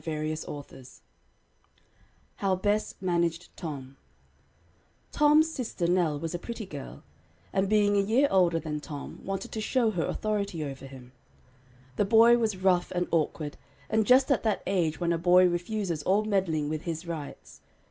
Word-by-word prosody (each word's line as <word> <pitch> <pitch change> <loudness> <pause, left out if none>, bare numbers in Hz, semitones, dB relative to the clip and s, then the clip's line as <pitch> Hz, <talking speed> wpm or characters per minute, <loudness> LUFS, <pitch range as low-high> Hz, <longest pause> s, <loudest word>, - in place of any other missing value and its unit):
HOW 195 -2 +1
BESS 205 +3 -1
MANAGED 170 -2 -1
TOM 140 -4 -7 1.1
Tom's 300 +2 +4
sister 235 - -3
Nell 170 -4 +1
was 165 +1 -4
a 175 - -3
pretty 230 +2 -6
girl, 145 -7 -9 0.5
and 190 0 +1
being 205 -1 +3
a - - +4
year 230 +8 +3
older 175 -3 +3
than 155 -2 -4
Tom, 145 -1 -8
wanted 195 0 -4
to 220 - -4
show 230 0 +1
her 175 -5 -1
authority 200 -6 -2
over 135 -1 -7
him. 130 -2 -13 0.9
The 205 - +2
boy 230 +3 +6
was 215 -4 0
rough 185 -1 +2
and 180 0 0
awkward, 155 -2 -1 0.3
and 220 -1 +2
just 260 +2 +5
at 275 - +3
that 215 -3 -1
age 170 -5 0
when 170 -1 +1
a 165 - -1
boy 180 +1 +5
refuses 175 -1 -2
all 195 +7 +2
meddling 180 -8 0
with 155 0 -3
"his 165 0 -5
rights." 160 -4 -8
180 Hz, 150 wpm, -28 LUFS, 165-215 Hz, 1.1 s, boy